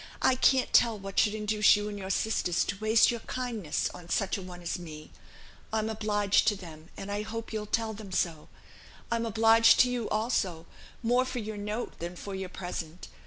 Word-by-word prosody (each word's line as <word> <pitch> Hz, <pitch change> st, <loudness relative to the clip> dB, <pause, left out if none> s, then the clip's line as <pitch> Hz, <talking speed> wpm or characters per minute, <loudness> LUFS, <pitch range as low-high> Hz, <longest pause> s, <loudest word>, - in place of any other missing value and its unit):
I 260 Hz, -, +5 dB
can't 260 Hz, 0 st, +3 dB
tell 230 Hz, -2 st, +5 dB
what 195 Hz, 0 st, -3 dB
should 215 Hz, -1 st, +3 dB
induce 210 Hz, -1 st, +4 dB
you 205 Hz, 0 st, -2 dB
and 210 Hz, -, -5 dB
your 190 Hz, -1 st, -6 dB
sisters 195 Hz, -3 st, +1 dB
to 200 Hz, -, -3 dB
waste 220 Hz, +2 st, +4 dB
your 235 Hz, -, -3 dB
kindness 230 Hz, -9 st, -3 dB
on 175 Hz, -1 st, -12 dB
such 195 Hz, 0 st, 0 dB
a 195 Hz, -, -5 dB
one 180 Hz, -1 st, -10 dB
as 170 Hz, +2 st, -3 dB
me. 155 Hz, -3 st, -10 dB, 0.6 s
I'm 220 Hz, 0 st, 0 dB
obliged 210 Hz, -2 st, +1 dB
to 210 Hz, -, +4 dB
them, 165 Hz, -4 st, -11 dB
and 195 Hz, +1 st, -6 dB
I 205 Hz, +1 st, -1 dB
hope 225 Hz, +1 st, -6 dB
you'll 210 Hz, -1 st, -3 dB
tell 225 Hz, +1 st, -1 dB
them 210 Hz, -2 st, -10 dB
so. 165 Hz, -4 st, -1 dB, 0.6 s
I'm 230 Hz, 0 st, 0 dB
obliged 225 Hz, +1 st, +5 dB
to 250 Hz, -, +3 dB
you 240 Hz, -3 st, -2 dB
also, 200 Hz, -7 st, -1 dB, 0.4 s
more 245 Hz, +2 st, +3 dB
for 255 Hz, 0 st, -5 dB
your 215 Hz, -2 st, -4 dB
note 210 Hz, +3 st, -4 dB
than 175 Hz, +1 st, -5 dB
for 200 Hz, +3 st, -7 dB
your 190 Hz, -1 st, -4 dB
present. 175 Hz, -2 st, -6 dB
210 Hz, 200 wpm, -29 LUFS, 185-225 Hz, 0.6 s, I